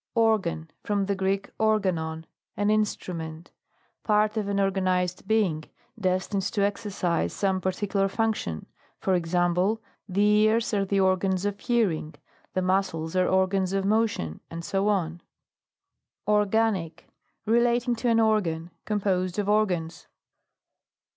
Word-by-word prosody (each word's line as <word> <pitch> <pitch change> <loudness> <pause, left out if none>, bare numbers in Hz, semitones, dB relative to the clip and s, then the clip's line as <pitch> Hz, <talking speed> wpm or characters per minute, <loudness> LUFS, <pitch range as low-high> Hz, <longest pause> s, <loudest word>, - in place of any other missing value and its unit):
ORGAN. 205 -8 +1
From 205 -1 0
the 200 0 -1
Gieek, 195 +1 -1
organon 185 -7 0
t - - -31 0.3
an 205 +1 +2
instrument. 170 -6 -2 0.5
Part 215 0 +2
of 215 -2 -1
an 200 0 -1
orga 195 -1 +1
nised 180 0 0
being, 190 -9 +1 0.3
destined 185 +1 0
to 200 +1 -1
exercise 190 - -1
some 190 -1 0
particular 195 +1 0
function; 205 - -2 0.3
for 190 - 0
ex 175 -1 -1
ample, 180 +5 +2 0.3
the 195 +3 +1
ears 215 +2 +3
are 200 -1 +1
the 195 0 +1
organs 190 0 +1
of 205 0 -2
hearing, 195 -11 0 0.4
the 185 - +1
muscles 185 -3 0
are 185 0 +3
organs 190 0 +1
of 195 0 0
motion, 205 - 0 0.2
&,c. 170 +4 -6 1.5
ORGANIC. 210 -4 +1 0.4
Relating 240 +2 +2
to 240 +1 0
an 230 0 +4
organ. 180 -7 +1
Com 210 -1 -1
posed 185 -2 0
of 205 -1 -1
organs. 180 -6 0
195 Hz, 130 wpm, -26 LUFS, 180-210 Hz, 1.5 s, an